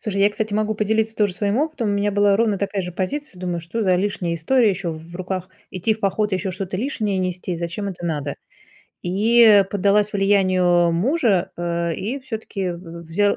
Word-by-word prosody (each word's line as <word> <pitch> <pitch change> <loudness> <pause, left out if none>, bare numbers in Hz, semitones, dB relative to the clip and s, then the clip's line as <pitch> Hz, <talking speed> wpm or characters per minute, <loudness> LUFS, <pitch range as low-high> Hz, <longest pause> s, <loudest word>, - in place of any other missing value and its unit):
Слушай, 200 -2 -2
я, 205 - +6
кстати, 210 0 -3
могу 215 0 0
поделиться 220 +1 0
тоже 205 -4 +1
своим 205 +4 0
опытом. 295 -7 -1
У - - +1
меня 200 +1 +1
была 205 -1 +4
ровно 215 -3 +1
такая 200 -1 -2
же 180 -1 -6
позиция. 200 - -4
Думаю, 175 -2 -2
что 215 +7 -3
за 185 -2 +3
лишняя 185 -3 -1
история 230 +8 +3
еще 185 -2 -3
в 165 +2 -9
руках 185 0 -4 0.2
идти 190 +4 0
в 220 - -15
поход, 205 +1 0
и - - +3
еще 185 +1 -3
что-то 190 0 -4
лишнее 215 -4 -1
нести, 180 -1 -2
зачем 170 +4 -4
это 175 -2 -7
надо? 145 -4 -2 0.7
И 210 +2 +5
поддалась 205 +1 +2
влиянию 185 -3 +3
мужа, 215 - +1
э, 170 -1 -1
и 235 +9 -4
всё-таки 215 -6 -4
в 170 -1 -8
взял 200 +5 +1
195 Hz, 195 wpm, -22 LUFS, 180-215 Hz, 0.7 s, я